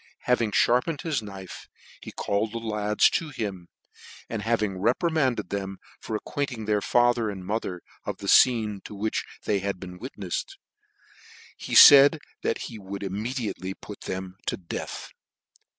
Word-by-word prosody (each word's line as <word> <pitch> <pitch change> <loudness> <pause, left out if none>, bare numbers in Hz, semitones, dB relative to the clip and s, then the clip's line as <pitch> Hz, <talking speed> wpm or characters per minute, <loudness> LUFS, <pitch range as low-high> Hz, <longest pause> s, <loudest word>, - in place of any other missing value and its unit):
Having 115 -4 +1
fharpened 125 - +2
his 155 -7 -1
knife, 95 -4 -9 0.4
ne - - -8
called 105 +2 -1
the - - -3
lads 105 -2 +2
to 165 - -1
him, 100 -10 -5 0.6
and 110 -2 -4
having 105 -4 0
reprimanded 130 - +1
them 95 -1 -3 0.2
for 110 - -5
ac 105 - -4
quainting 130 -6 -3
their 105 -1 +1
father 120 0 +2
and 95 -3 -7
mother 95 -4 -3 0.2
of - - -4
the - - -9
fcene 105 -2 +4
to 105 - -8
which 110 +2 -2 0.2
they 100 -2 +1
had 100 -1 -3
been 90 -1 -9
witneffes, 120 - -5 1.0
he - - -5
faid 145 +2 +10 0.2
that - - -1
he 115 -3 -8
would 100 0 -7
immediately 105 -1 -4
put 105 - -11
them 95 0 -5
to - - -1
death. 85 -3 -6
105 Hz, 150 wpm, -26 LUFS, 95-120 Hz, 1.0 s, faid